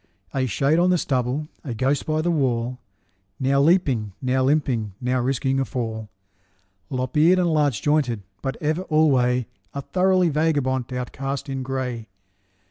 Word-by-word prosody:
A 130 Hz, -1 st, 0 dB
shade 140 Hz, -, +2 dB
on 180 Hz, +1 st, +4 dB
the 180 Hz, -, +4 dB
stubble, 130 Hz, +1 st, -1 dB, 0.2 s
a 125 Hz, -6 st, -4 dB
ghost 130 Hz, +4 st, 0 dB
by 155 Hz, 0 st, 0 dB
the 175 Hz, -, +1 dB
wall, 125 Hz, -5 st, 0 dB, 0.6 s
Now 140 Hz, +1 st, +2 dB
leaping, 140 Hz, -, +2 dB
now 130 Hz, 0 st, +1 dB
limping, 130 Hz, -7 st, +1 dB
now 125 Hz, +1 st, 0 dB
risking 135 Hz, +1 st, 0 dB
a -, -, +2 dB
fall, 115 Hz, -5 st, -4 dB, 0.8 s
Lop 130 Hz, 0 st, -3 dB
eared 165 Hz, +5 st, +5 dB
and 175 Hz, -3 st, +2 dB
large 145 Hz, -8 st, +1 dB
jointed, 140 Hz, -8 st, +1 dB, 0.2 s
but 135 Hz, -, -3 dB
ever 155 Hz, +3 st, 0 dB
alway 130 Hz, -6 st, +3 dB, 0.3 s
A 140 Hz, -, -2 dB
thoroughly 185 Hz, 0 st, +2 dB
vagabond 140 Hz, -5 st, 0 dB
outcast 135 Hz, +2 st, -4 dB
in 135 Hz, -1 st, -3 dB
gray. 130 Hz, -3 st, -3 dB
135 Hz, 150 wpm, -23 LUFS, 125-155 Hz, 0.8 s, eared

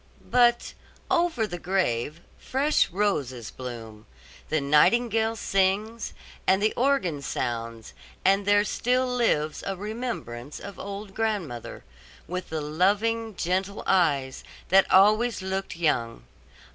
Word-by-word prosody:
But 240 Hz, -1 st, +3 dB, 0.4 s
over 335 Hz, -10 st, +2 dB
the 175 Hz, -4 st, -6 dB
grave 165 Hz, -5 st, -1 dB, 0.2 s
fresh 285 Hz, +4 st, +1 dB
roses 140 Hz, -, -1 dB
bloom, 115 Hz, -4 st, -9 dB, 0.4 s
the 155 Hz, -, +1 dB
nightingale 225 Hz, +10 st, +3 dB
sings, 205 Hz, +3 st, 0 dB, 0.3 s
and 190 Hz, +1 st, +4 dB
the 215 Hz, +2 st, +1 dB
organ 240 Hz, -, +1 dB
sounds 115 Hz, -4 st, -4 dB, 0.3 s
and 195 Hz, +1 st, +3 dB
there 205 Hz, 0 st, +5 dB
still 250 Hz, +4 st, +1 dB
lives 225 Hz, -12 st, 0 dB
a 195 Hz, -, -3 dB
remembrance 205 Hz, -, -5 dB
of 200 Hz, -1 st, -9 dB
old 200 Hz, 0 st, -7 dB
grandmother, 200 Hz, -, -3 dB, 0.4 s
with 180 Hz, +1 st, -5 dB
the 160 Hz, -1 st, -3 dB
loving, 205 Hz, +8 st, 0 dB
gentle 185 Hz, +3 st, -2 dB
eyes 140 Hz, -8 st, +1 dB, 0.3 s
that 195 Hz, +1 st, +5 dB
always 215 Hz, +3 st, +4 dB
looked 190 Hz, -1 st, -3 dB
young. 115 Hz, -, 0 dB
195 Hz, 115 wpm, -26 LUFS, 150-220 Hz, 0.4 s, there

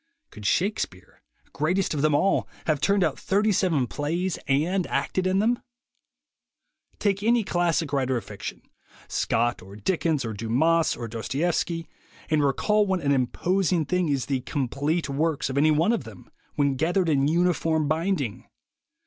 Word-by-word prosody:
Could 105 Hz, -2 st, -5 dB
Shakespeare, 175 Hz, -, -2 dB, 0.3 s
greatest 175 Hz, +6 st, 0 dB
of 145 Hz, -, -1 dB
them 150 Hz, -1 st, +3 dB
all, 195 Hz, +7 st, +2 dB, 0.2 s
have 155 Hz, -3 st, 0 dB
turned 200 Hz, -1 st, +3 dB
out -, -, -1 dB
thirty 210 Hz, +2 st, +1 dB
seven 170 Hz, -9 st, +2 dB
plays 165 Hz, +8 st, -2 dB
and 170 Hz, +7 st, +1 dB
acted 185 Hz, 0 st, -1 dB
in 185 Hz, +1 st, +2 dB
them? 230 Hz, +4 st, +2 dB, 1.4 s
Take 200 Hz, -1 st, 0 dB
any 230 Hz, +2 st, +3 dB
classic 170 Hz, -4 st, 0 dB
writer 130 Hz, -2 st, +1 dB
of 115 Hz, -, -6 dB
fiction, -, -, -7 dB, 0.4 s
Scott 120 Hz, +1 st, 0 dB
or 95 Hz, +2 st, -12 dB
Dickens 155 Hz, -, 0 dB
or 110 Hz, -, -3 dB
Dumas 135 Hz, +11 st, +1 dB
or 120 Hz, -1 st, -5 dB
Dostoevsky, 160 Hz, -, -2 dB, 0.4 s
and 155 Hz, -2 st, +3 dB
recall 210 Hz, +10 st, +2 dB
what 190 Hz, -2 st, 0 dB
an 140 Hz, -, +1 dB
imposing 170 Hz, +6 st, +1 dB
thing 180 Hz, +1 st, 0 dB
is 140 Hz, -3 st, 0 dB
the 135 Hz, -2 st, -1 dB
"complete 145 Hz, +5 st, -1 dB
works" 145 Hz, 0 st, -1 dB
of 130 Hz, -, -4 dB
any 155 Hz, +2 st, +4 dB
one 155 Hz, +7 st, +3 dB
of 230 Hz, -, -1 dB
them 110 Hz, -6 st, -12 dB, 0.3 s
when 140 Hz, -2 st, +1 dB
gathered 175 Hz, +5 st, +1 dB
in 140 Hz, -3 st, +2 dB
uniform 165 Hz, -2 st, +1 dB
binding! 155 Hz, -, -1 dB
155 Hz, 155 wpm, -25 LUFS, 135-180 Hz, 1.4 s, any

